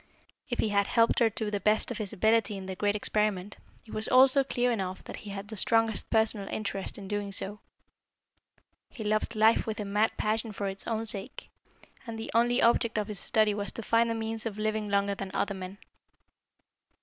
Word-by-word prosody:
If 240 Hz, -, -2 dB
he 220 Hz, -, +1 dB
had 200 Hz, -1 st, +2 dB
helped 230 Hz, -1 st, +3 dB
her 230 Hz, -2 st, +4 dB
to 215 Hz, 0 st, -4 dB
the 205 Hz, -, -1 dB
best 215 Hz, +4 st, +2 dB
of 235 Hz, -, -4 dB
his 205 Hz, -3 st, -4 dB
ability 220 Hz, 0 st, +2 dB
in 190 Hz, -, -7 dB
the 190 Hz, 0 st, -5 dB
great 205 Hz, +2 st, 0 dB
experiment, 210 Hz, -2 st, -1 dB, 0.3 s
it 220 Hz, -, -12 dB
was 215 Hz, -, -3 dB
also 265 Hz, +2 st, +6 dB
clear 245 Hz, -2 st, 0 dB
enough 190 Hz, -4 st, -3 dB
that -, -, -8 dB
he 210 Hz, -, -10 dB
had 200 Hz, +1 st, -7 dB
the 220 Hz, -, -6 dB
strongest 225 Hz, 0 st, +1 dB
personal 220 Hz, -3 st, +2 dB
interest 200 Hz, -2 st, -4 dB
in 195 Hz, -2 st, -8 dB
doing 205 Hz, 0 st, -3 dB
so. 200 Hz, +2 st, -2 dB, 1.3 s
He 225 Hz, -, -8 dB
loved 215 Hz, +2 st, -1 dB
life 220 Hz, +2 st, +4 dB
with 220 Hz, 0 st, -3 dB
a 210 Hz, -, -3 dB
mad 210 Hz, +2 st, +1 dB
passion 220 Hz, +1 st, -1 dB
for 200 Hz, -, -4 dB
its 195 Hz, 0 st, -3 dB
own 225 Hz, -1 st, -1 dB
sake, 200 Hz, -3 st, -6 dB, 0.6 s
and 230 Hz, -1 st, -5 dB
the 225 Hz, -, -6 dB
only 240 Hz, +2 st, +3 dB
object 235 Hz, -1 st, +3 dB
of 210 Hz, 0 st, -1 dB
his 205 Hz, -3 st, -3 dB
study 215 Hz, 0 st, +3 dB
was 205 Hz, 0 st, -3 dB
to 230 Hz, -, +3 dB
find 230 Hz, +1 st, +2 dB
a 230 Hz, -, -1 dB
means 225 Hz, 0 st, -3 dB
of 210 Hz, -2 st, -6 dB
living 215 Hz, 0 st, -1 dB
longer 200 Hz, 0 st, +1 dB
than 195 Hz, -1 st, -6 dB
other 200 Hz, -, 0 dB
men. 190 Hz, 0 st, -7 dB
215 Hz, 210 wpm, -29 LUFS, 200-225 Hz, 1.3 s, also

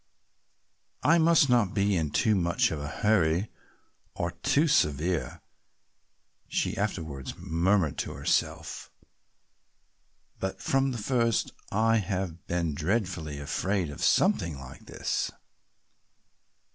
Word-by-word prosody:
"I 165 Hz, +3 st, +5 dB
must 165 Hz, -2 st, +5 dB
not 120 Hz, -6 st, +2 dB
be 100 Hz, -1 st, +2 dB
in 80 Hz, -4 st, 0 dB
too 110 Hz, +9 st, +2 dB
much 85 Hz, -4 st, +1 dB
of 80 Hz, -, -3 dB
a 75 Hz, -, -5 dB
hurry 90 Hz, +1 st, +1 dB, 0.6 s
or -, -, -2 dB
too 150 Hz, +4 st, +1 dB
severe," 80 Hz, -, +1 dB, 1.1 s
she -, -, -1 dB
afterwards 80 Hz, -10 st, -3 dB
murmured 90 Hz, -1 st, +1 dB
to -, -, -3 dB
herself, -, -, -1 dB, 1.5 s
"but 95 Hz, 0 st, -3 dB
from 135 Hz, 0 st, +1 dB
the 125 Hz, -, -4 dB
first 115 Hz, 0 st, +1 dB, 0.2 s
I 115 Hz, +2 st, +3 dB
have 90 Hz, -4 st, -3 dB
been 85 Hz, -3 st, -1 dB
dreadfully 85 Hz, -3 st, -2 dB
afraid 90 Hz, +4 st, -1 dB
of 75 Hz, -, -6 dB
something 80 Hz, -4 st, +2 dB
like 65 Hz, -1 st, -12 dB
this." -, -, -2 dB
95 Hz, 110 wpm, -28 LUFS, 80-110 Hz, 1.5 s, I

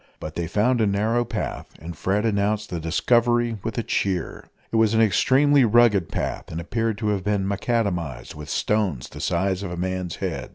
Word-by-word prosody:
But 75 Hz, -, -6 dB
they 85 Hz, 0 st, -3 dB
found 115 Hz, +7 st, +2 dB
a 110 Hz, -, +3 dB
narrow 110 Hz, +4 st, +1 dB
path, 115 Hz, -2 st, -4 dB
and 85 Hz, +2 st, -8 dB
Fred 100 Hz, +7 st, 0 dB
announced 105 Hz, 0 st, 0 dB
the 85 Hz, -, -2 dB
discovery 120 Hz, +7 st, +1 dB
with 115 Hz, -2 st, -4 dB
a 115 Hz, -, 0 dB
cheer. 95 Hz, -4 st, -2 dB, 0.2 s
It 115 Hz, -, +1 dB
was 110 Hz, 0 st, +3 dB
an -, -, +3 dB
extremely 135 Hz, +7 st, +4 dB
rugged 115 Hz, -6 st, +4 dB
path, -, -, -4 dB
and 80 Hz, -, -4 dB
appeared 115 Hz, +5 st, -2 dB
to 105 Hz, -1 st, -1 dB
have 100 Hz, -3 st, -1 dB
been 100 Hz, -1 st, 0 dB
macadamised 95 Hz, -, -2 dB
with 75 Hz, 0 st, -9 dB
stones 95 Hz, -, -1 dB
the -, -, -9 dB
size 95 Hz, +2 st, 0 dB
of 100 Hz, -, -4 dB
a 90 Hz, -, -6 dB
man's 90 Hz, -1 st, -3 dB
head. -, -, -4 dB
105 Hz, 195 wpm, -23 LUFS, 90-115 Hz, 0.2 s, extremely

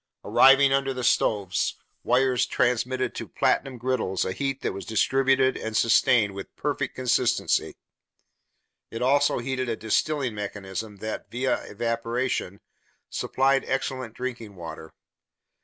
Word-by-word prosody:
Arriving 135 Hz, 0 st, +6 dB
under 135 Hz, -1 st, 0 dB
the 125 Hz, -, -4 dB
stoves, 105 Hz, -5 st, +1 dB, 0.3 s
wires 125 Hz, 0 st, +2 dB
transmitted 125 Hz, +1 st, 0 dB
to -, -, -6 dB
platinum 135 Hz, -2 st, 0 dB
griddles 120 Hz, -6 st, -1 dB
a -, -, -2 dB
heat 135 Hz, +5 st, -3 dB
that -, -, -1 dB
was 100 Hz, -, -6 dB
distributed 130 Hz, +4 st, +2 dB
and 110 Hz, 0 st, -3 dB
sustained 115 Hz, -2 st, +4 dB
with 95 Hz, 0 st, -9 dB
perfect 145 Hz, -2 st, -2 dB
consistency. 125 Hz, -1 st, +1 dB, 1.1 s
It 115 Hz, -, -4 dB
also 140 Hz, +2 st, +3 dB
heated 130 Hz, 0 st, -2 dB
a 115 Hz, -, 0 dB
distilling 130 Hz, +4 st, 0 dB
mechanism 105 Hz, 0 st, -6 dB
that, 110 Hz, -, -5 dB
via 130 Hz, +2 st, -1 dB
evaporation, 115 Hz, -2 st, -2 dB, 0.5 s
supplied 135 Hz, +1 st, +1 dB
excellent 130 Hz, -3 st, -3 dB
drinking 120 Hz, -5 st, -6 dB
water. 80 Hz, -2 st, -9 dB
125 Hz, 125 wpm, -25 LUFS, 110-135 Hz, 1.1 s, Arriving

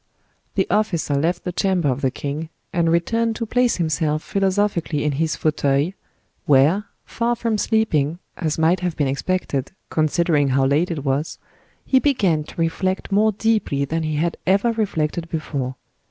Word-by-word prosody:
The -, -, +2 dB
officer 195 Hz, -8 st, +1 dB
left 160 Hz, +6 st, 0 dB
the 180 Hz, -, -3 dB
chamber 180 Hz, -3 st, +1 dB
of 130 Hz, 0 st, 0 dB
the 135 Hz, -, +2 dB
king, 145 Hz, +4 st, -5 dB, 0.2 s
and 170 Hz, -2 st, +2 dB
returned 225 Hz, +7 st, +1 dB
to 230 Hz, -, -3 dB
place 245 Hz, +2 st, +2 dB
himself 155 Hz, -2 st, 0 dB
philosophically 195 Hz, -6 st, 0 dB
in 150 Hz, -, +1 dB
his 155 Hz, +3 st, 0 dB
fauteuil, 145 Hz, 0 st, +1 dB, 0.6 s
where, 150 Hz, +9 st, +4 dB, 0.2 s
far 235 Hz, +1 st, -1 dB
from 230 Hz, -2 st, -1 dB
sleeping, 170 Hz, -10 st, +1 dB, 0.2 s
as 155 Hz, -4 st, -2 dB
might 165 Hz, +3 st, +3 dB
have 180 Hz, -2 st, -3 dB
been 145 Hz, -, +1 dB
expected, 140 Hz, 0 st, -2 dB, 0.2 s
considering 155 Hz, -1 st, +2 dB
how 135 Hz, 0 st, +2 dB
late 150 Hz, +6 st, +2 dB
it 155 Hz, -4 st, -4 dB
was, 140 Hz, +3 st, -1 dB, 0.5 s
he 260 Hz, -, +4 dB
began 200 Hz, -, +2 dB
to -, -, -11 dB
reflect 185 Hz, +4 st, -1 dB
more 215 Hz, +2 st, +4 dB
deeply 210 Hz, -10 st, 0 dB
than 165 Hz, +4 st, -2 dB
he 155 Hz, -1 st, -2 dB
had 165 Hz, +3 st, 0 dB
ever 200 Hz, +5 st, +3 dB
reflected 170 Hz, -7 st, -1 dB
before. 140 Hz, -5 st, -3 dB
165 Hz, 160 wpm, -21 LUFS, 150-195 Hz, 0.6 s, where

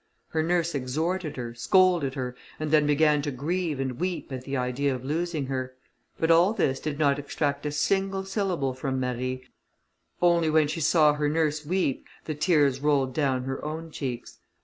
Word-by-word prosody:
Her 160 Hz, -, 0 dB
nurse 170 Hz, +1 st, +1 dB
exhorted 155 Hz, +6 st, -2 dB
her, 120 Hz, -2 st, -5 dB
scolded 170 Hz, +1 st, +3 dB
her, 125 Hz, -2 st, -4 dB, 0.2 s
and 155 Hz, -1 st, -3 dB
then 150 Hz, -1 st, +4 dB
began 150 Hz, 0 st, +3 dB
to 145 Hz, -, -2 dB
grieve 155 Hz, +3 st, -2 dB
and 130 Hz, -2 st, -3 dB
weep 180 Hz, -4 st, -3 dB
at 130 Hz, -1 st, -6 dB
the 140 Hz, 0 st, -2 dB
idea 130 Hz, +2 st, 0 dB
of 125 Hz, 0 st, -8 dB
losing 160 Hz, 0 st, -1 dB
her. 130 Hz, -1 st, -4 dB, 0.4 s
But 165 Hz, 0 st, +2 dB
all 175 Hz, +5 st, +5 dB
this 135 Hz, -, 0 dB
did 150 Hz, -2 st, -4 dB
not 145 Hz, -2 st, +2 dB
extract 145 Hz, 0 st, -2 dB
a -, -, -2 dB
single 195 Hz, +5 st, 0 dB
syllable 185 Hz, -9 st, -1 dB
from 130 Hz, 0 st, -3 dB
Marie, 130 Hz, 0 st, -2 dB, 0.8 s
only 170 Hz, -2 st, +3 dB
when 155 Hz, -1 st, +4 dB
she 155 Hz, +2 st, -3 dB
saw 150 Hz, -1 st, +5 dB
her 150 Hz, 0 st, 0 dB
nurse 155 Hz, -1 st, 0 dB
weep 165 Hz, -4 st, -1 dB, 0.2 s
the 155 Hz, -, -2 dB
tears 150 Hz, -4 st, +2 dB
rolled 140 Hz, -3 st, +1 dB
down 135 Hz, -4 st, 0 dB
her 135 Hz, +1 st, -4 dB
own 160 Hz, +2 st, -5 dB
cheeks. 130 Hz, -5 st, -5 dB
150 Hz, 180 wpm, -26 LUFS, 135-165 Hz, 0.8 s, all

